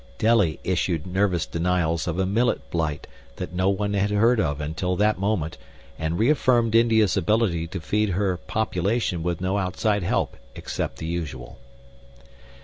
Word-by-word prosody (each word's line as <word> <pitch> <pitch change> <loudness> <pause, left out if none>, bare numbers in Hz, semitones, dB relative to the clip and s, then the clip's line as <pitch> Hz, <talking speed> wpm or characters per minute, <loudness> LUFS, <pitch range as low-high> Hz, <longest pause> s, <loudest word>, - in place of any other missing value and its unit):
Delhi 110 -8 +3
issued 90 -3 -1
nervous 95 -1 +1
denials 85 -1 0
of 85 0 -2
a 95 - +1
millet 115 +6 0
blight 80 -3 -2 0.3
that - - -6
no 95 +2 +1
one 100 +1 -1
had 100 +1 +1
heard 110 +3 +3
of 75 -6 0
until 80 +5 -2
that 105 +1 +2
moment 95 -6 -1 0.4
and 80 +1 -1
reaffirmed 120 -2 +3
India's 115 -3 +4
ability 95 -3 +1
to 90 +2 -5
feed 105 +6 0
her 95 -1 0
population 100 -1 -1
with 85 0 -2
no 95 +2 0
outside 100 +3 0
help 85 - -1 0.2
except - - -4
the 80 - -6
usual. 70 -7 -5
95 Hz, 150 wpm, -24 LUFS, 85-105 Hz, 0.4 s, India's